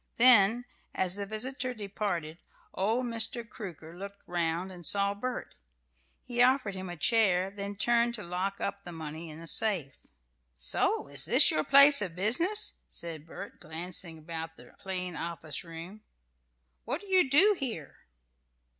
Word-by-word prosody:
Then, 240 Hz, -1 st, +5 dB, 0.3 s
as 185 Hz, -1 st, +2 dB
the 200 Hz, 0 st, -4 dB
visitor 255 Hz, +4 st, -3 dB
departed, 195 Hz, -6 st, -4 dB, 0.3 s
old 225 Hz, +6 st, 0 dB
Mr. 230 Hz, 0 st, -1 dB
Crooker 170 Hz, -, -9 dB
looked 200 Hz, +2 st, -10 dB
round 175 Hz, +1 st, -2 dB
and 175 Hz, -2 st, -11 dB
saw 200 Hz, +3 st, +3 dB
Bert. 250 Hz, +5 st, -5 dB, 0.7 s
He 240 Hz, -1 st, -1 dB
offered 255 Hz, -4 st, +3 dB
him 190 Hz, -1 st, -6 dB
a 175 Hz, -, -7 dB
chair, 195 Hz, -2 st, +2 dB
then 200 Hz, 0 st, -6 dB
turned 235 Hz, +2 st, +2 dB
to 210 Hz, -, -7 dB
lock 185 Hz, +3 st, -3 dB
up 200 Hz, 0 st, -4 dB
the 175 Hz, -, -9 dB
money 160 Hz, 0 st, -7 dB
in 155 Hz, +1 st, -10 dB
a 165 Hz, -, -10 dB
safe. 170 Hz, -7 st, +1 dB, 0.6 s
"So -, -, +1 dB
this -, -, -3 dB
is -, -, +8 dB
your 155 Hz, -, 0 dB
place 280 Hz, -, +7 dB
of 180 Hz, -5 st, -4 dB
business?" 255 Hz, -, +2 dB
said 165 Hz, -2 st, -5 dB
Bert, -, -, -10 dB
glancing 165 Hz, +1 st, -4 dB
about 160 Hz, +1 st, -7 dB
the -, -, -15 dB
plain 180 Hz, -2 st, -5 dB
office 160 Hz, -2 st, -4 dB
room. 170 Hz, +5 st, -10 dB, 0.8 s
"What 270 Hz, +8 st, -4 dB
do 405 Hz, -, -14 dB
you 370 Hz, -7 st, +3 dB
do 390 Hz, +10 st, +6 dB
here?" 220 Hz, -, -5 dB
195 Hz, 155 wpm, -29 LUFS, 170-235 Hz, 0.8 s, is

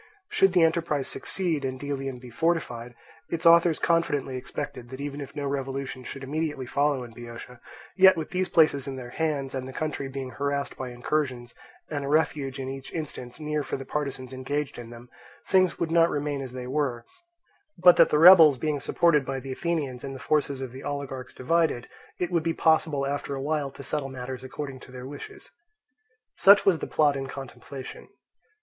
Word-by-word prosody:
Should 195 Hz, -1 st, +3 dB
the 180 Hz, -3 st, +5 dB
enterprise 160 Hz, -4 st, +1 dB
succeed, 170 Hz, -7 st, -1 dB
and 130 Hz, -1 st, -3 dB
Delium 135 Hz, -2 st, -4 dB
be 125 Hz, 0 st, -12 dB
fortified, 125 Hz, -6 st, -1 dB, 0.3 s
its 170 Hz, +1 st, -3 dB
authors 170 Hz, -1 st, +6 dB
confidently 145 Hz, -6 st, +1 dB
expected 125 Hz, -1 st, -6 dB
that 130 Hz, +1 st, -8 dB
even 145 Hz, 0 st, -5 dB
if 140 Hz, -, -9 dB
no 145 Hz, -1 st, -3 dB
revolution 135 Hz, -1 st, -3 dB
should 135 Hz, +2 st, -7 dB
immediately 150 Hz, -1 st, -2 dB
follow 140 Hz, +1 st, +1 dB
in 120 Hz, -, -10 dB
Boeotia, 120 Hz, +1 st, -10 dB, 0.4 s
yet 190 Hz, -1 st, +7 dB
with 160 Hz, -, -4 dB
these 185 Hz, 0 st, 0 dB
places 145 Hz, -4 st, +3 dB
in 135 Hz, -, -4 dB
their 125 Hz, -2 st, -8 dB
hands, 145 Hz, -3 st, -2 dB
and 130 Hz, -1 st, -4 dB
the -, -, -7 dB
country 150 Hz, 0 st, -3 dB
being 135 Hz, -1 st, -6 dB
harassed 140 Hz, 0 st, -2 dB
by 130 Hz, -1 st, -5 dB
incursions, 125 Hz, -1 st, -2 dB, 0.4 s
and 145 Hz, -2 st, -2 dB
a -, -, -4 dB
refuge 145 Hz, -3 st, +1 dB
in 135 Hz, -1 st, -4 dB
each 135 Hz, 0 st, -7 dB
instance 140 Hz, -6 st, -6 dB
near 150 Hz, -1 st, -1 dB
for 140 Hz, -, -4 dB
the 135 Hz, -, -8 dB
partisans 135 Hz, -3 st, -4 dB
engaged 140 Hz, +1 st, -3 dB
in 120 Hz, -1 st, -9 dB
them, 120 Hz, +1 st, -11 dB, 0.4 s
things 185 Hz, -2 st, +3 dB
would 165 Hz, -1 st, -2 dB
not 165 Hz, 0 st, +5 dB
remain 145 Hz, -1 st, -2 dB
as 130 Hz, -2 st, -7 dB
they 125 Hz, -1 st, -6 dB
were, 130 Hz, -3 st, -1 dB, 0.7 s
but 180 Hz, 0 st, +7 dB
that -, -, +7 dB
the 150 Hz, -, +3 dB
rebels 160 Hz, -4 st, +9 dB
being 150 Hz, +1 st, -1 dB
supported 150 Hz, +1 st, +3 dB
by 135 Hz, 0 st, -3 dB
the 135 Hz, +1 st, -7 dB
Athenians 140 Hz, -4 st, -2 dB
and 135 Hz, -1 st, -5 dB
the -, -, -8 dB
forces 140 Hz, -1 st, 0 dB
of 130 Hz, -2 st, -5 dB
the 130 Hz, +2 st, -9 dB
oligarchs 140 Hz, -3 st, -5 dB
divided, 160 Hz, -3 st, +1 dB, 0.3 s
it 180 Hz, 0 st, -2 dB
would 170 Hz, -2 st, +2 dB
be 165 Hz, +1 st, -1 dB
possible 160 Hz, -3 st, +2 dB
after 140 Hz, 0 st, -3 dB
a -, -, -4 dB
while 145 Hz, 0 st, -1 dB
to 140 Hz, +1 st, -11 dB
settle 140 Hz, -1 st, -2 dB
matters 130 Hz, 0 st, -6 dB
according 135 Hz, 0 st, -6 dB
to 130 Hz, -, -14 dB
their 125 Hz, 0 st, -8 dB
wishes. 395 Hz, -, -10 dB, 0.9 s
Such 200 Hz, +3 st, +7 dB
was 180 Hz, -5 st, +4 dB
the -, -, -4 dB
plot 150 Hz, -2 st, +3 dB
in 135 Hz, -1 st, -3 dB
contemplation. 135 Hz, 0 st, -9 dB
140 Hz, 195 wpm, -26 LUFS, 130-155 Hz, 0.9 s, rebels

